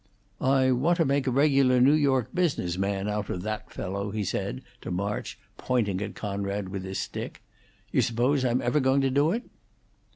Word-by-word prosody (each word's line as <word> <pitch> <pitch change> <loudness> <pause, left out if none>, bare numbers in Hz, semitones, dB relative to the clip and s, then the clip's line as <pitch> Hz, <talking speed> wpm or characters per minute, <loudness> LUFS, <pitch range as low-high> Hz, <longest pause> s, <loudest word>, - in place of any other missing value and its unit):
"I 130 0 +3
want 150 +8 +2
to 165 - +3
make 140 0 +1
a - - +2
regular 135 -2 +4
New 135 +4 +6
York 135 -6 +2
business 160 - 0
man 100 +1 -1
out 105 -1 -2
of 90 - -3
that 110 0 -4
fellow," 100 +2 -4
he 105 0 -2
said - - -3 0.2
to - - -6
March, 100 +3 -3 0.2
pointing 105 -7 0
at 105 0 -5
Conrad 100 -1 -3
with 95 -1 -5
his 95 0 -4
stick. - - -5 0.5
"You - - +3
s'pose 125 +4 +1
I'm 125 0 +1
ever 120 +5 +2
going 135 0 +3
to 135 -1 +1
do 145 +4 +3
it?" 235 +6 -1
120 Hz, 190 wpm, -27 LUFS, 100-135 Hz, 0.5 s, New